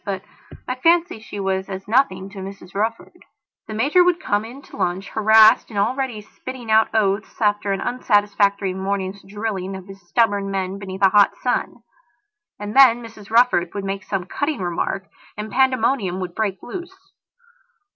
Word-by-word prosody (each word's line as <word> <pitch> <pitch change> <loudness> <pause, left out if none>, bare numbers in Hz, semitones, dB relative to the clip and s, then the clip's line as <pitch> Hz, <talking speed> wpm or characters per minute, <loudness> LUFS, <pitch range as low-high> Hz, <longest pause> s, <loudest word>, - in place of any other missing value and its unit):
But 195 -1 -4 0.4
I 255 - -1
fancy 335 -1 +2
she 215 -2 -8
was 190 0 -2
as 190 0 -6
nothing 195 -5 +1
to 200 - -9
Mrs 195 -1 -9
Rufford. 220 +3 -3 0.4
The 215 - -6
Major 290 +11 +4
would 355 0 +2
come 205 - 0
in 250 +5 -10
to - - -14
lunch 180 +2 -2
harassed 220 0 +5
and 215 - -7
already 245 +1 -1
spitting 245 +2 -8
out 220 0 +5
oaths 210 -1 0
after 205 -2 +1
an 195 - -1
unsatisfactory 205 -5 +1
morning's 190 0 -3
drilling 195 -2 -4
of 190 -1 -9
his 195 0 -12
stubborn 205 -3 +2
men 195 0 -3
beneath 190 -1 -6
a 195 - +7
hot 205 0 +4
sun. 245 -1 -1 0.8
And 205 +2 -6
then 245 -3 +6
Mrs 220 -3 -12
Rufford 225 -7 +3
would 200 -1 -3
make 195 0 -3
some 195 -3 -3
cutting 285 +10 -2
remark 180 +2 -2 0.3
and 210 0 -5
pandemonium 255 -6 +1
would 180 -2 -5
break 200 -3 -2
loose. 380 +5 -9
205 Hz, 165 wpm, -21 LUFS, 195-235 Hz, 0.8 s, a